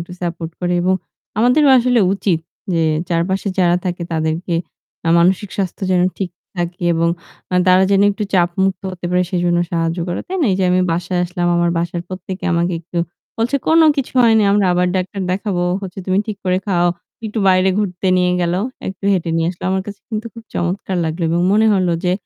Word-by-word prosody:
একটু 170 Hz, +2 st, -8 dB
সাপোর্ট 170 Hz, -2 st, -4 dB
করে। 175 Hz, 0 st, 0 dB
এবং 185 Hz, +1 st, +2 dB, 0.4 s
আমাদেরও 270 Hz, +5 st, +4 dB
আসলে 245 Hz, -1 st, +3 dB
উচিত 190 Hz, -4 st, 0 dB, 0.3 s
যে 165 Hz, -1 st, +2 dB, 0.3 s
চারপাশে 185 Hz, +4 st, 0 dB
যারা 175 Hz, -1 st, +4 dB
থাকে 180 Hz, -1 st, -3 dB
তাদেরকে 160 Hz, +2 st, -1 dB, 0.5 s
আ -, -, +2 dB
মানসিক 185 Hz, +3 st, +2 dB
স্বাস্থ্য 195 Hz, 0 st, -3 dB
যেন 180 Hz, -1 st, +3 dB, 0.2 s
ঠিক 190 Hz, -3 st, -2 dB, 0.3 s
থাকে 175 Hz, +1 st, -3 dB
এবং 165 Hz, +1 st, +2 dB, 0.4 s
আ -, -, +1 dB
তারা 185 Hz, +1 st, +6 dB
যেন 195 Hz, 0 st, +4 dB
একটু 200 Hz, +1 st, -4 dB
চাপ 175 Hz, -1 st, +3 dB
মুক্ত 190 Hz, 0 st, 0 dB
হতে 180 Hz, -1 st, -10 dB
পারে 180 Hz, 0 st, +2 dB
সেজন্য 175 Hz, -2 st, +1 dB
সাহায্য 165 Hz, +1 st, 0 dB
করে, 175 Hz, -, -2 dB
তাই 380 Hz, -, -2 dB
না? 300 Hz, -, +3 dB
এই 185 Hz, -, +1 dB
যে 190 Hz, -, +2 dB
আমি 185 Hz, -, +3 dB
বাসায় 175 Hz, +1 st, -1 dB
আসলাম। 175 Hz, 0 st, -2 dB
আমার 170 Hz, 0 st, +2 dB
বাসার 170 Hz, 0 st, -2 dB
প্রত্যেকে 185 Hz, 0 st, -6 dB
আমাকে 170 Hz, +1 st, +1 dB
একটু 170 Hz, +1 st, -5 dB, 0.4 s
বলছে, 235 Hz, +5 st, +1 dB
"কোন 325 Hz, +1 st, +5 dB, 0.2 s
কিছু 275 Hz, -2 st, -2 dB
হয়নি। 225 Hz, -2 st, +5 dB
আমরা 200 Hz, -2 st, +3 dB
আবার 180 Hz, 0 st, +2 dB
ডাক্তার 190 Hz, +2 st, -3 dB
দেখাবো। 190 Hz, -1 st, -1 dB, 0.2 s
হচ্ছে 195 Hz, -1 st, -7 dB
তুমি 185 Hz, +1 st, +2 dB
ঠিক 215 Hz, -, -4 dB
করে 185 Hz, 0 st, +2 dB
খাও।" 175 Hz, -3 st, +2 dB, 0.4 s
একটু 220 Hz, +1 st, -4 dB
বাইরে 185 Hz, 0 st, +4 dB
ঘুরতে 190 Hz, -2 st, -2 dB
নিয়ে 180 Hz, 0 st, +2 dB
গেলো। 175 Hz, +2 st, 0 dB, 0.3 s
একটু 190 Hz, +1 st, -8 dB
হেঁটে 175 Hz, -3 st, 0 dB
নিয়ে 165 Hz, 0 st, +1 dB
আসলো। 175 Hz, -, -10 dB
আমার 190 Hz, 0 st, 0 dB
কাছে 205 Hz, -1 st, -8 dB
কিন্তু 220 Hz, 0 st, -4 dB
খুব 230 Hz, -1 st, -11 dB
চমৎকার 185 Hz, +2 st, -2 dB
লাগলো 160 Hz, +2 st, -3 dB
এবং 170 Hz, +1 st, +1 dB
মনে 220 Hz, +2 st, +4 dB
হলো 185 Hz, -3 st, +1 dB
যে 180 Hz, -, +2 dB
180 Hz, 200 wpm, -18 LUFS, 175-195 Hz, 0.5 s, তারা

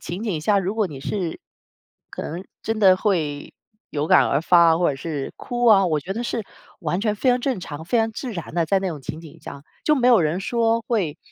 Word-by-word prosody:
情 175 Hz, +5 st, -6 dB
景 195 Hz, -9 st, -2 dB
下， 200 Hz, +6 st, +2 dB
如 195 Hz, +2 st, -2 dB
果 220 Hz, -2 st, +1 dB
你 145 Hz, -6 st, -9 dB
是 175 Hz, +2 st, -3 dB, 0.7 s
可 -, -, -6 dB
能 170 Hz, +4 st, -5 dB, 0.2 s
真 225 Hz, -1 st, -2 dB
的 190 Hz, -3 st, +6 dB
会 160 Hz, -8 st, -1 dB, 0.4 s
有 150 Hz, +1 st, -2 dB
感 -, -, +5 dB
而 140 Hz, -, +1 dB
发 170 Hz, -1 st, +5 dB
或 180 Hz, -, +2 dB
者 140 Hz, -, -5 dB
是 145 Hz, -1 st, -4 dB
哭 245 Hz, 0 st, -2 dB
啊， 200 Hz, -4 st, +6 dB
我 155 Hz, -3 st, 0 dB
觉 185 Hz, +7 st, -5 dB
得 235 Hz, -, -3 dB
是 235 Hz, -1 st, -2 dB, 0.4 s
完 175 Hz, +1 st, -1 dB
全 215 Hz, -2 st, +1 dB
非 255 Hz, +5 st, -1 dB
常 245 Hz, -, +4 dB
正 250 Hz, -5 st, -1 dB
常、 160 Hz, -2 st, -7 dB
非 230 Hz, +7 st, +1 dB
常 225 Hz, 0 st, +1 dB
自 245 Hz, +2 st, -5 dB
然 170 Hz, -4 st, -7 dB
的， 170 Hz, -1 st, +2 dB
在 195 Hz, +3 st, +2 dB
那 190 Hz, -, -2 dB
种 155 Hz, -5 st, -6 dB
情 155 Hz, +5 st, -6 dB
景 160 Hz, -3 st, -13 dB
下。 140 Hz, -, -9 dB, 0.2 s
就 305 Hz, -, +4 dB
没 250 Hz, -3 st, +2 dB
有 235 Hz, -7 st, +6 dB
人 160 Hz, +4 st, 0 dB
说 230 Hz, +2 st, +1 dB
会， 180 Hz, -10 st, -1 dB
185 Hz, 255 characters per minute, -22 LUFS, 160-225 Hz, 0.7 s, 的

